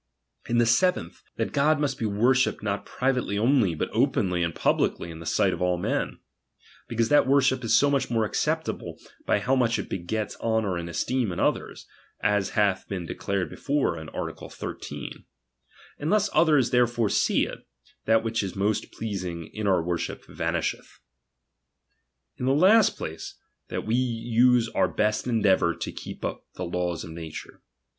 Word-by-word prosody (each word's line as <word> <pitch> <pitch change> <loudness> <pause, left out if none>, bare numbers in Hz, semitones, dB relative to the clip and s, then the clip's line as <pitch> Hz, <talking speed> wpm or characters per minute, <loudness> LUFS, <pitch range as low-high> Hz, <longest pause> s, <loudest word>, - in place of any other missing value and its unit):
In 120 - +2
the 120 - +4
seventh, 115 - +1
that - - -2
God 145 +1 +3
must 140 -3 -1
be 110 - 0
worshipped 120 +4 +2
not 100 -1 -2
privately 125 -6 0
only, 115 - +3
but - - -3
openly 90 -2 +1
and 85 -2 -1
publicly 85 - 0
in 80 - -9
the 85 - -8
sight - - +2
of - - -6
all 90 0 +2
men; 85 - -2 0.7
because 115 -1 0
that 145 -3 +5
worship 130 -2 +3
is 115 -1 +4
so 145 - +4
much 135 -2 +1
more 115 -2 +1
acceptable, - - -2 0.3
by - - +3
how 125 +6 +1
much 120 -3 +2
it - - -5
begets 100 +4 -3
honour 110 -4 0
and 85 0 -4
esteem 120 +6 -1
in 85 - -5
others; - - -1 0.3
as 105 -1 +1
hath 100 -3 +2
been 95 -4 -4
declared 100 +2 -2
before 145 0 0
in 80 0 -8
art. - - -5
13. - - -7 0.8
Unless 205 +7 +1
others 150 -5 +4
therefore 120 -2 +2
see - - +2
it, - - -8 0.5
that 110 0 +3
which 115 0 0
is 95 -2 -5
most 100 +2 -1
pleasing 90 -6 -5
in 105 -1 -3
our 90 -4 +3
worship 85 0 -3
vanisheth. - - -3 1.4
In 125 - -2
the 135 - +3
last 200 +7 +5
place, 80 +1 -6 0.3
that - - -4
we 110 - -1
use 120 0 +3
our - - +2
best 105 +3 0
endeavour 100 -7 +3
to 85 - -5
keep - - -8
the - - -3 0.3
laics 90 -1 -2
of 80 - -8
nature. 80 -1 -8
110 Hz, 165 wpm, -26 LUFS, 95-125 Hz, 1.4 s, that